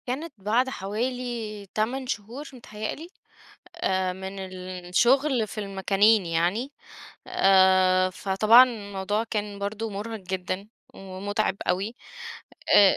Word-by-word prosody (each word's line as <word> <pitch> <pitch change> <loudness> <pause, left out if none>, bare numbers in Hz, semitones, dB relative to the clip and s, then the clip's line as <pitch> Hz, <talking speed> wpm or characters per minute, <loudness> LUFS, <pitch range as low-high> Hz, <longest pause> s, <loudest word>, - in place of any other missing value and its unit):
كانت 285 +5 -4
بعد 225 +6 +1
حوالي 225 -1 -4
8 255 +5 -1
شهور 240 +5 -5
متهيّأ 215 -4 -6
لي، 330 +3 -10 0.7
آآ 190 - 0
من 190 +1 -7 0.5
الشغل 245 +5 +3
في 215 - -9
المكانين 200 +1 +2
يعني. 175 - 0 0.5
آآ 185 -1 +4
فطبعًا 215 +6 +6
الموضوع 205 -3 -3
كان 210 -2 -4
برضه 215 +2 -3
مُرهق 210 +2 -5
جدًا 185 +1 -4 0.3
ومُتعِب 195 +1 -3
أوي 195 +6 0 0.8
آآ 200 -2 +7
205 Hz, 105 wpm, -26 LUFS, 190-235 Hz, 0.8 s, آآ